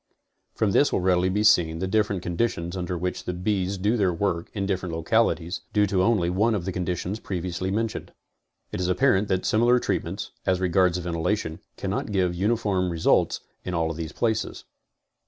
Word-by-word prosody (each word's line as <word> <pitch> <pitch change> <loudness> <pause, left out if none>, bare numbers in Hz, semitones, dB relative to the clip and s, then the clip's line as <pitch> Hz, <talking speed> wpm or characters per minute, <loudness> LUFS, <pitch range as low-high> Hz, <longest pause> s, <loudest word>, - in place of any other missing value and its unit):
From 105 -3 +1
this 140 +8 +4
will - - +1
readily 90 0 +2
be 105 +3 0
seen 85 -7 +4
the 95 - -2
different 100 -2 0
conditions 85 -1 -1
under 90 -1 -3
which 90 +1 -3
the 90 - -3
bees 95 +1 -1
do 105 +5 +1
their 95 -4 +2
work 85 -1 -1
in 100 -1 -1
different 95 -3 -2
localities, 90 0 +1
due 105 -1 +4
to 95 -2 +1
only 100 -4 +2
one 105 +6 +2
of 90 -4 -3
the 95 - -2
conditions 90 +3 -3
previously 90 -1 -3
mentioned. 110 +2 -2 0.6
It - - -4
is 90 - 0
apparent 100 +1 +3
that 95 -2 0
similar 120 +3 +4
treatments, - - -2
as 95 -1 +1
regards 90 0 +2
ventilation, 85 0 -2 0.2
cannot - - -3
give 90 -3 +1
uniform 95 -1 0
results 85 -2 +2 0.2
in 90 - -3
all 80 0 0
these 80 -1 -5
places. 110 +2 -1
95 Hz, 175 wpm, -25 LUFS, 90-105 Hz, 0.6 s, this